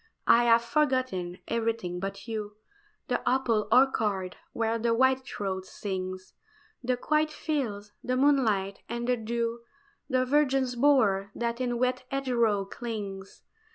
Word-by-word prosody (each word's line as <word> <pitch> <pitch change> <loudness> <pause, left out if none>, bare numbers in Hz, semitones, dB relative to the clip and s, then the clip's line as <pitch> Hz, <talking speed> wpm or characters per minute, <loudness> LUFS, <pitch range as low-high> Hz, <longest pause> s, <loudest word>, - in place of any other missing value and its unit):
I 240 +1 +6
have 230 0 +5
forgotten 245 - 0
everything 225 -6 -1
but 195 +2 -5
you 210 -2 -4 0.5
The - - 0
apple 240 -5 +1
orchard 215 -7 +3 0.2
where 230 0 -1
the 230 0 +1
whitethroat 230 -7 0
sings, 185 -2 -5 0.5
The 250 0 0
quiet 305 +4 +1
fields, 235 -11 -3
the 255 0 0
moonlight, 225 -9 +2
and 235 +1 -3
the 250 - +3
dew, 230 +1 -2 0.5
The 255 -1 +2
virgin's 265 -2 +2
bower 225 -8 +3
that 235 +1 -2
in 245 -1 0
wet 255 +1 0
hedgerow 235 -7 +1
clings. 200 -3 -6
235 Hz, 125 wpm, -28 LUFS, 200-255 Hz, 0.5 s, I